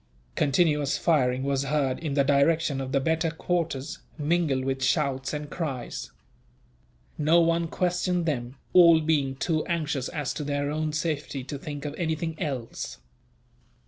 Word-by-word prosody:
Continuous 150 Hz, -1 st, +2 dB
firing 130 Hz, -6 st, +2 dB
was 140 Hz, 0 st, 0 dB
heard 135 Hz, -2 st, 0 dB
in 150 Hz, -4 st, -3 dB
the 140 Hz, -, +4 dB
direction 140 Hz, +1 st, +2 dB
of 130 Hz, 0 st, -4 dB
the 140 Hz, -, +3 dB
better 160 Hz, +4 st, +1 dB
quarters, 160 Hz, -4 st, -2 dB, 0.2 s
mingled 150 Hz, -4 st, +1 dB
with 135 Hz, -1 st, -1 dB
shouts 135 Hz, -2 st, +1 dB
and 150 Hz, 0 st, -4 dB
cries. 135 Hz, -8 st, -4 dB, 1.1 s
No 155 Hz, +3 st, +5 dB
one 165 Hz, 0 st, +2 dB
questioned 180 Hz, 0 st, 0 dB
them, 125 Hz, -5 st, -2 dB, 0.2 s
all 170 Hz, -3 st, +8 dB
being 150 Hz, -4 st, +1 dB
too 155 Hz, +3 st, 0 dB
anxious 155 Hz, -6 st, -1 dB
as 150 Hz, -5 st, -3 dB
to 150 Hz, -, -4 dB
their 145 Hz, 0 st, -1 dB
own 155 Hz, 0 st, -1 dB
safety 150 Hz, -3 st, -2 dB
to 140 Hz, +2 st, -6 dB
think 145 Hz, 0 st, -6 dB
of 145 Hz, -, -3 dB
anything 160 Hz, -1 st, -1 dB
else. 135 Hz, -8 st, -4 dB
150 Hz, 145 wpm, -27 LUFS, 135-165 Hz, 1.1 s, all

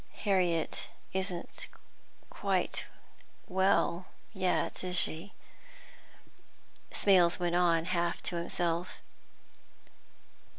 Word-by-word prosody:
"Harriet 180 Hz, -6 st, +1 dB, 0.3 s
isn't 190 Hz, -2 st, -3 dB, 0.6 s
quite -, -, 0 dB, 0.6 s
well 190 Hz, -2 st, +2 dB, 0.3 s
yet, 185 Hz, -2 st, 0 dB
is 180 Hz, -1 st, 0 dB
she?" 175 Hz, +4 st, 0 dB, 1.6 s
Smales 180 Hz, -4 st, +4 dB
went 175 Hz, -1 st, -1 dB
on, 170 Hz, -2 st, +3 dB
half 175 Hz, -1 st, 0 dB
to 175 Hz, -, -1 dB
himself. 170 Hz, +1 st, -2 dB
180 Hz, 75 wpm, -31 LUFS, 170-185 Hz, 1.6 s, Smales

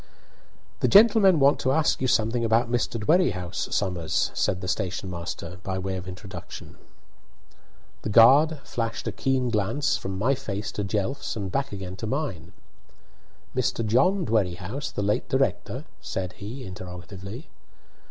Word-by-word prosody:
"The -, -, +2 dB
gentlemen 200 Hz, -4 st, +6 dB
want 140 Hz, +1 st, +4 dB
to 130 Hz, -, +1 dB
ask 155 Hz, 0 st, +2 dB
you 130 Hz, -, +1 dB
something 115 Hz, 0 st, +1 dB
about 115 Hz, +1 st, +2 dB
Mr. 120 Hz, -1 st, 0 dB
Dwerrihouse, 105 Hz, -, +1 dB
Somers," 90 Hz, -5 st, 0 dB
said 90 Hz, -, 0 dB
the 95 Hz, -, -6 dB
station 95 Hz, 0 st, -2 dB
master, 85 Hz, +1 st, -6 dB
by 95 Hz, 0 st, -3 dB
way 95 Hz, 0 st, -3 dB
of 95 Hz, 0 st, -6 dB
introduction. 95 Hz, +2 st, -9 dB, 1.3 s
The -, -, -4 dB
guard 140 Hz, +8 st, +6 dB
flashed 115 Hz, 0 st, -3 dB
a -, -, 0 dB
keen 125 Hz, +4 st, 0 dB
glance 110 Hz, +7 st, +1 dB
from 95 Hz, 0 st, -5 dB
my 120 Hz, +8 st, +2 dB
face 100 Hz, -7 st, -4 dB
to 105 Hz, -, -3 dB
Jelf's 105 Hz, +8 st, -2 dB
and 100 Hz, -4 st, -4 dB
back 140 Hz, +5 st, -1 dB
again 95 Hz, -2 st, -6 dB
to 110 Hz, -, -4 dB
mine. 105 Hz, -, -3 dB, 1.0 s
"Mr. 120 Hz, -2 st, 0 dB
John 140 Hz, -, +3 dB
Dwerrihouse, 105 Hz, +4 st, -1 dB
the 100 Hz, -, -3 dB
late 105 Hz, +1 st, 0 dB
director?" -, -, 0 dB, 0.2 s
said 90 Hz, -1 st, -4 dB
he, 115 Hz, +7 st, -8 dB
interrogatively. 95 Hz, -, -8 dB
105 Hz, 145 wpm, -26 LUFS, 95-130 Hz, 1.3 s, gentlemen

